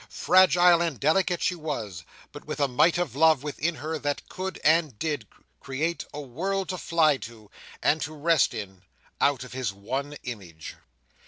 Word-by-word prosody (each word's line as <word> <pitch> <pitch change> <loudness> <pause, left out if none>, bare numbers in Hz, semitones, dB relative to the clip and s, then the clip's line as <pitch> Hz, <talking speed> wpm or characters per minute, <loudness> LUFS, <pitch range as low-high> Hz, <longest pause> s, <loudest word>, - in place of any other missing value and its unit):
Fragile 180 -2 +5
and 165 -8 -1
delicate 175 - +2
she - - +2
was, 115 - -5 0.3
but - - -10
with - - -5
a 140 - +3
might 135 +7 +3
of 175 -6 -2
love 155 -2 +4
within 155 +3 -2
her 155 +3 -4
that 145 0 -3
could, 190 -1 -5
and 155 -6 +3
did, 150 +3 -3 0.3
create 155 +6 -3
a 150 - -7
world 185 +8 -3
to 185 - -2
fly 160 -4 +3
to, 110 -4 -11 0.3
and 155 +1 +3
to 155 - -3
rest 155 -3 +2
in, 95 -4 -7 0.4
out 140 -3 +2
of 125 - -11
his 130 -5 -2
one 135 +9 -5
image. 90 -10 -8
150 Hz, 170 wpm, -26 LUFS, 125-170 Hz, 0.4 s, Fragile